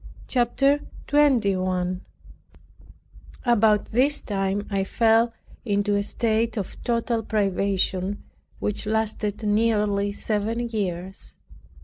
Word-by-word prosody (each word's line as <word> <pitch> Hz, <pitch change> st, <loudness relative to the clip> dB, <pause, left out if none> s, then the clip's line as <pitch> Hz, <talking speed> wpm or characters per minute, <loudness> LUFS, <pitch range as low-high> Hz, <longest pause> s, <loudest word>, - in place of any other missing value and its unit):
CHAPTER 275 Hz, +3 st, +2 dB, 0.3 s
21 185 Hz, -10 st, +2 dB, 1.4 s
About 220 Hz, -3 st, +4 dB
this 270 Hz, +6 st, +3 dB
time 195 Hz, 0 st, -2 dB
I 195 Hz, -1 st, +1 dB
fell 225 Hz, +3 st, +3 dB, 0.3 s
into 205 Hz, -2 st, +1 dB
a 200 Hz, -, +2 dB
state 225 Hz, +2 st, 0 dB
of 195 Hz, -, -5 dB
total 235 Hz, -1 st, 0 dB
privation 195 Hz, -2 st, -1 dB, 0.3 s
which 210 Hz, +1 st, -3 dB
lasted 215 Hz, -1 st, -1 dB
nearly 210 Hz, -2 st, +1 dB
seven 220 Hz, +3 st, -2 dB
years. 190 Hz, -4 st, -4 dB
210 Hz, 90 wpm, -24 LUFS, 200-230 Hz, 1.4 s, About